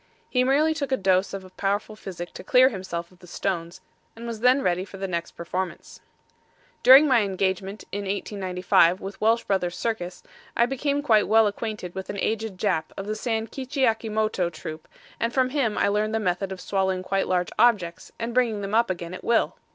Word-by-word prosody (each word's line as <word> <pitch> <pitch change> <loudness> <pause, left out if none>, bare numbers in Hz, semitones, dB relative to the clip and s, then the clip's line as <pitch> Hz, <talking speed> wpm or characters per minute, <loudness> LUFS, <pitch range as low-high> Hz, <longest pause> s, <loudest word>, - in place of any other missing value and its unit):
He 250 -1 +3
merely 290 +5 +3
took 285 -3 -4
a 265 - +3
dose 190 -1 +2
of 190 -1 -8
powerful 205 +2 -1
physic 175 -4 -8
to - - -9
clear 255 +6 +5
himself 185 -5 -5
of 180 - -22
the 180 - -15
stones, 175 0 -3 0.3
and 230 +1 -9
was 230 -2 -5
then 250 +3 +4
ready 180 0 +1
for 195 0 -11
the 195 0 -3
next 170 -2 -3
performance. 180 +1 -5 0.8
During 270 +4 +9
my 255 -4 +4
engagement 195 0 -2
in 205 0 -3
1895 185 -3 +1
with 195 +1 -8
Welsh 225 +2 +3
Bros. 180 -3 -1
Circus 180 -4 -3 0.3
I 235 - +5
became 280 +3 -1
quite 220 -7 +4
well 225 0 +5
acquainted 210 -3 -4
with 190 0 -6
an 200 - -4
aged 220 -1 -2
Jap 180 -5 0
of 195 - -4
the 215 +1 -3
San 225 0 -2
Kitchy 265 +3 -4
Akimoto 215 -5 0
troupe 155 0 -8 0.3
and 230 - 0
from 255 0 +1
him 255 -7 0
I - - +3
learned 210 +2 0
the - - +1
method 190 -1 -1
of 190 - -6
swallowing 190 -2 -1
quite 195 +1 0
large 180 -2 0
objects 195 -8 +2
and 230 +1 -4
bringing 230 -4 +1
them 200 +1 -5
up 230 0 +3
again 175 -1 -4
at 185 - -8
will. 235 -1 +2
200 Hz, 200 wpm, -25 LUFS, 185-230 Hz, 0.8 s, During